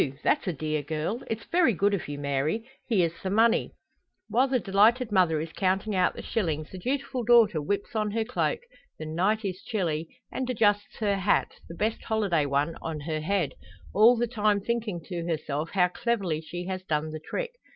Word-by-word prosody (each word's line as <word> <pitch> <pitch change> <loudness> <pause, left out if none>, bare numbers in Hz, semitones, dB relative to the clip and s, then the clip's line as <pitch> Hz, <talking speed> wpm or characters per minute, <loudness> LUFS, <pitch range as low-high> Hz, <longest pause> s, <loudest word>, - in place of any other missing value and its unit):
that's - - +2
a - - +2
dear 155 0 -2
girl! 155 - -3
It's 225 -1 -3
very 335 -9 +3
good 200 +4 +2
of 195 - -2
you, 145 0 -5
Mary. 145 - -1 0.2
Here's 175 -8 +1
the 190 - -2
money." 225 +3 +3 0.5
While 255 +3 +3
the 260 -1 +1
delighted 220 +4 +3
mother 175 -5 +3
is 160 +1 -4
counting 195 +2 0
out 185 -1 +2
the - - -7
shillings, 155 -8 -2
the 185 - -7
dutiful 260 +3 -2
daughter 225 -8 +5
whips 200 +8 -2
on 215 -1 +1
her 225 +2 0
cloak 250 - -1 0.4
the 155 - -6
night 190 +8 0
is 185 -1 -3
chilly 165 -7 -2 0.2
and 260 -1 -3
adjusts 205 -4 +1
her 200 -2 +2
hat, 195 +1 +2 0.2
the 170 - -7
best 215 +5 -1
holiday 195 -9 +1
one, 145 +4 0
on 160 -2 -4
her 155 +1 -2
head; 180 -2 0 0.4
all 230 +4 +6
the 240 - +2
time 215 -3 +1
thinking 215 -4 -2
to 170 0 -5
herself 155 -1 -2
how 180 -2 +4
cleverly 190 -7 -1
she 175 +2 -6
has 185 0 -3
done 155 -3 -2
the 155 - -5
trick. - - -3
195 Hz, 195 wpm, -27 LUFS, 160-220 Hz, 0.5 s, all